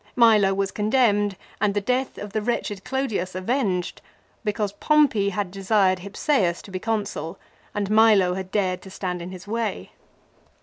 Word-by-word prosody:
Milo 215 -5 +5
was 195 -1 -1
condemned 210 -3 +2 0.2
and 205 -1 +2
the - - +3
death 250 +5 -1
of 205 0 -7
the 215 - 0
wretched 210 -3 -2
Clodius 220 -9 -2
avenged, 185 -3 -1 0.4
because 210 -1 -1
Pompey 235 -4 +3
had 200 -1 -3
desired 195 -1 +2
Hypsseus 195 - 0
to 200 - -12
be 185 - -3
Consul 200 -6 -3 0.4
and 205 -1 -1
Milo 215 -4 +5
had 190 0 -5
dared 185 -3 0
to 190 - -11
stand 180 -2 -4
in 175 - -6
his 185 +1 -10
way. 225 0 -3
205 Hz, 160 wpm, -24 LUFS, 185-220 Hz, 0.4 s, Milo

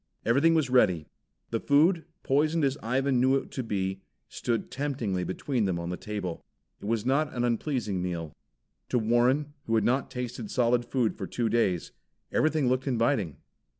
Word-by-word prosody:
Everything 140 +8 +4
was 155 -4 +2
ready. 90 -11 +4 0.5
The 115 - 0
food, 160 +6 +3 0.2
poisoned 155 +4 +2
as 135 -1 +2
Ivan 130 +2 +1
knew 130 +1 +4
it 135 - -2
to 130 - -3
be, 95 -4 -2 0.3
stood 115 -2 -2
temptingly 125 -10 -2
between 115 +5 -1
them, 95 -3 0
on 85 +1 -4
the - - -2
table. 100 -4 -5 0.4
It - - -8
was 115 0 0
not 145 +3 +2
an 120 - 0
unpleasing 115 - -1
meal. 85 -4 -4 0.6
To 125 - +2
Warren, 125 +6 +2
who 115 - +1
had 110 - +3
not 130 +3 +1
tasted 125 - -5
solid 120 -3 +2
food 120 -4 0
for - - -3
two 120 -2 -1
days, 95 -8 +1 0.4
everything 155 -3 +2
looked 130 +2 +1
inviting. 115 - +1
120 Hz, 170 wpm, -28 LUFS, 105-140 Hz, 0.6 s, Everything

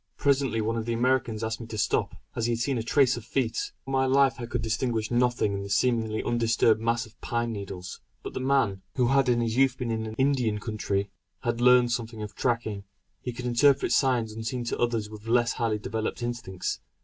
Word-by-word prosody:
Presently 135 -5 +2
one 115 +2 -1
of 115 0 -3
the 115 - 0
Americans 120 -2 +1
asked 115 +1 -3
me 115 - -7
to 110 - -6
stop, - - 0 0.2
as 115 0 0
he 120 - +1
had 115 - -2
seen 125 +1 0
a - - -1
trace 125 +2 +3
of 120 - -7
feet. 410 - -1
For 135 - -6
my 135 0 +2
life 135 0 +4
I 120 - -4
could 120 -1 -3
distinguish 115 -1 -1
nothing 120 -4 +2
in 100 - -3
the 100 - -6
seemingly 110 -1 +1
undisturbed 115 -2 +2
mass 115 0 0
of 110 +1 -20
pine 120 0 -1
needles. 95 -3 -7 0.2
But - - -6
the - - -3
man, 130 -8 +1
who 125 -2 +2
in 125 -3 +3
his 115 0 -1
youth 135 -1 +4
had - - -27
been 120 -3 -3
in 110 -1 -3
Indian 130 -5 +1
country, 105 -2 -2 0.3
had 120 0 -1
learned 125 -1 +6
something 115 -2 -3
of 105 - -7
tracking; 115 -5 -1 0.4
he 125 - -4
could 125 +1 -7
interpret 130 +3 +3
signs 125 -5 +2
unseen 115 +3 -3
to 120 - -3
others 115 -3 0
with 105 +1 -11
less 120 0 +3
highly 115 -3 0
developed 110 +3 -3
instincts. 115 -6 -3
115 Hz, 215 wpm, -27 LUFS, 110-125 Hz, 0.4 s, learned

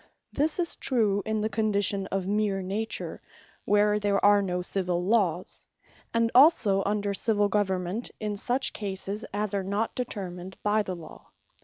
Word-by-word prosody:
This 300 +2 +1
is 345 -3 -1
true 215 -6 +1
in 220 -1 0
the 215 - +1
condition 205 -3 0
of 195 -1 -2
meer 200 -1 0
Nature, 215 +4 -3 0.4
where 210 0 +3
there 200 -1 +1
are 205 0 +6
no 180 -2 -2
Civill 180 -2 -1
Lawes; 190 -5 0 0.5
and 230 0 +1
also 245 - +5
under 205 -1 0
Civill 205 0 +1
Government, 190 +1 -1
in 210 -1 -3
such 245 +6 +1
cases 200 +2 -4
as 205 0 -2
are 200 - 0
not 200 +4 -1
determined 190 -6 -6
by 210 +1 +2
the 190 -3 -4
Law. 165 -2 -12
205 Hz, 155 wpm, -27 LUFS, 195-215 Hz, 0.5 s, are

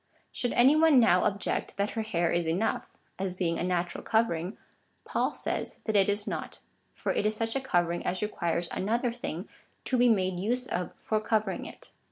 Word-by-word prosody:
Should 245 - -2
any 265 +5 +6
one 310 -4 +6
now 185 -6 +5
object, 200 0 -1
that 200 +1 0
her 225 - -2
hair 175 -6 0
is 170 -1 0
enough, 190 +7 0 0.3
as 190 -1 -2
being 170 -3 0
a - - -1
natural 180 -1 -1
covering, 195 -4 0 0.5
Paul - - 0
says - - -4
that 220 - -1
it 195 0 +5
is 205 0 -1
not, - - -4 0.3
for - - -2
it - - 0
is 215 - 0
such 225 +2 -2
a 270 - 0
covering 175 -8 0
as 185 +3 -1
requires 170 -4 -1
another 235 +5 0
thing 200 -6 -5 0.4
to 255 - +1
be 245 0 +6
made 185 -4 +1
use 245 +6 0
of 180 -7 -3
for 215 -1 -1
covering 215 -3 -1
it. - - -13
205 Hz, 195 wpm, -29 LUFS, 180-230 Hz, 0.5 s, any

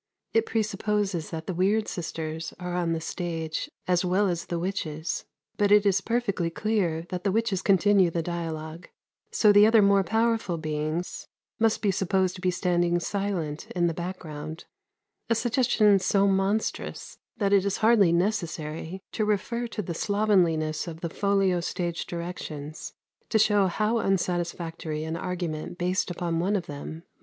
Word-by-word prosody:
It 225 0 +2
presupposes 205 -5 -1
that 160 -1 -5
the 185 - -3
"weird 200 +5 +2
sisters" 160 -2 -5
are 180 -1 -4
on 175 -2 0
the 165 - -1
stage 165 -1 -3 0.2
as 180 0 +2
well 185 +2 +2
as 170 -1 -3
the 170 - -2
witches. 165 -3 -3 0.3
But 205 -1 +2
it 210 0 +6
is 195 -1 +3
perfectly 210 -7 0
clear 175 -4 0
that 180 -1 -4
the 195 - +1
witches 215 -3 0
continue 195 -1 +4
the 165 0 -2
dialogue; 165 -1 -5 0.4
so 210 - +5
the 205 +1 +7
other 220 -1 +6
more 200 0 +5
powerful 225 -4 +1
beings 155 +2 -3 0.3
must 225 -1 +2
be 200 - +3
supposed 190 -1 +1
to 185 - -10
be 185 - +2
standing 175 -1 +1
silent 175 -6 -3
in 175 -1 +2
the 170 - +1
background 160 -3 -6 0.6
a 230 - +3
suggestion 225 -4 +3
so 195 +1 +2
monstrous 195 +2 -1 0.2
that 200 -2 +1
it 195 -2 +5
is 200 -1 0
hardly 220 -5 +5
necessary 170 -2 -2
to 220 - -1
refer 215 +3 -1
to 220 -2 -4
the 170 - -4
slovenliness 175 -6 +1
of 165 -1 -7
the 170 - -3
folio 195 -2 +2
stage 170 0 -3
directions 160 -3 -6 0.4
to 220 - +3
show 205 -2 +4
how 215 +5 +1
unsatisfactory 170 -5 -2
an 160 +1 -3
argument 175 -2 -4
based 185 +2 0
upon 170 -1 -2
one 195 +5 +1
of 185 -4 -1
them 145 0 -7
must 165 - -12
be. - - -46
180 Hz, 165 wpm, -27 LUFS, 165-205 Hz, 0.6 s, the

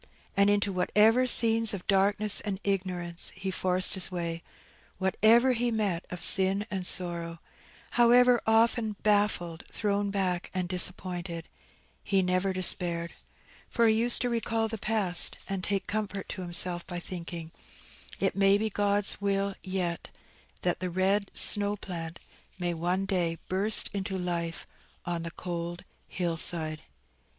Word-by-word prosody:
And 200 0 +4
into 205 -1 +1
whatever 220 +7 +3
scenes 225 -3 +4
of 185 - -9
darkness 200 +1 +3
and 195 -2 -4
ignorance 180 -3 -3
he 190 0 -4
forced 185 0 +2
his 190 -1 -2
way; 170 -2 -4 0.6
whatever 225 +7 +3
he 245 0 -1
met 205 -6 -2
of 180 -2 -4
sin 195 +3 +4
and 190 -2 -3
sorrow; 170 -2 -1 0.5
however 245 0 +4
often 225 0 +2
baffled, 205 -6 0
thrown 205 -1 -1
back, 185 -3 -2
and 180 -1 -1
disappointed, 175 -1 0 0.6
he 195 -1 +1
never 185 +1 0
despaired; 175 -2 0 0.5
for 235 - +1
he 220 - +4
used 235 +2 +3
to 245 - 0
recall 225 -1 -1
the 220 -1 -6
past, 200 -5 +1
and 195 -1 -4
take 195 -2 -2
comfort 205 -1 -4
to - - -6
himself 175 0 0
by 175 -1 -5
thinking, 170 -2 -8 0.7
"It 195 - 0
may 195 0 +4
be 220 +1 -2
God's 205 0 0
will 200 0 -1
yet, 185 -3 -4 0.5
that 175 - 0
the 185 0 -3
red 195 +3 0
snow 205 0 +5
plant 170 -4 -7 0.4
may 175 -1 -2
one 175 +4 -2
day 175 -4 -1
burst 200 +4 +4
into 195 -1 -3
life 170 -2 -4 0.4
on 175 -1 -3
the 165 - -5
cold 175 0 -6 0.2
hill 170 -2 -3
side." 155 -2 -1
190 Hz, 140 wpm, -28 LUFS, 175-205 Hz, 0.7 s, snow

